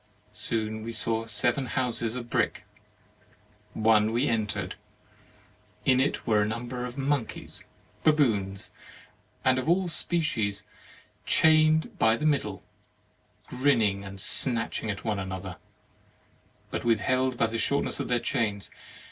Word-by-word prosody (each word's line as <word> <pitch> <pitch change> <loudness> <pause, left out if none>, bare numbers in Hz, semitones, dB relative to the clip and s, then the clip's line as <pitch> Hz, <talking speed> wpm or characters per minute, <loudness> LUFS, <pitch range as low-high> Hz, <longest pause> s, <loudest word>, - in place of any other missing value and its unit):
Soon 110 -1 +1
we 115 +2 -5
saw 115 0 0
seven 120 +4 +2
houses 120 0 0
of 120 -1 -5
brick. - - -1 1.1
One 110 0 +3
we 120 +5 +1
entered. 110 -4 -2 1.1
In 130 -1 +4
it 135 +2 0
were 110 -3 +3
a 105 - +1
number 120 +3 -4
of 125 +2 -8
monkeys, 135 -4 -2 0.4
baboons, 110 -11 +1 0.7
and 130 0 +3
all 170 +8 +2
of - - -4
that 175 - -1
species, 135 - +1 0.6
chained 155 0 +3
by 110 +1 +4
the 150 - -3
middle, 130 -10 0 0.8
grinning 115 -7 +1
and 95 0 -9
snatching 115 +1 +2
at 100 - -4
one 105 -3 -1
another, 95 -1 -6 1.1
but - - -3
withheld 130 +3 +1
by 115 - +2
the 115 0 -3
shortness 140 +4 0
of - - -3
their 120 -1 +1
chains. 105 -4 -2
115 Hz, 130 wpm, -27 LUFS, 105-130 Hz, 1.1 s, In